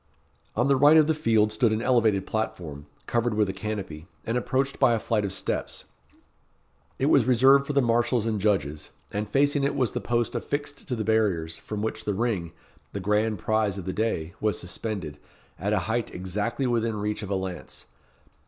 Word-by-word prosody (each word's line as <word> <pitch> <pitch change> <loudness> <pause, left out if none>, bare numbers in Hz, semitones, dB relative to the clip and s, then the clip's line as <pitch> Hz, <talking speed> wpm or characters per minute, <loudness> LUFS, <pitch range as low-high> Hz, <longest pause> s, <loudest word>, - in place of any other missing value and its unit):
On 120 +4 +2
the 140 - +4
right 145 +4 +7
of 155 - +6
the 160 - +2
field 110 -8 +2
stood 110 +1 +2
an 110 - 0
elevated 115 -6 +2
platform, 80 -9 -4 0.2
covered 120 -1 0
with 105 -1 +2
a - - -2
canopy, 95 -6 -5 0.2
and 115 - -1
approached 135 +2 0
by 120 - +5
a - - -1
flight 110 -1 0
of 100 - -2
steps. 95 - -3 1.1
It 135 - 0
was 140 -5 +4
reserved 135 +3 +5
for 145 - -2
the 140 -1 +3
marshals 120 0 +2
and 110 -3 -1
judges, 75 -8 0 0.2
and 105 +1 -3
facing 145 +1 +2
it 140 +1 0
was 125 -6 +1
the - - -3
post 120 -1 0
affixed 145 -1 -4
to 125 - -1
the 110 - -2
barriers, 100 -8 +1
from 105 -1 -5
which 110 - -3
the 105 - -1
ring, 100 -7 -1 0.4
the 100 - -3
grand 105 +3 +1
prize 110 -1 0
of 95 - -6
the 95 - -3
day, 90 -6 -1
was 105 -1 +1
suspended, 90 -5 -5 0.4
at 100 +2 -1
a 105 - +3
height 115 0 -1
exactly 105 +8 -2
within 115 -2 0
reach 105 0 -2
of 100 - -6
a 100 - 0
lance. 95 -2 -6
110 Hz, 195 wpm, -26 LUFS, 100-120 Hz, 1.1 s, right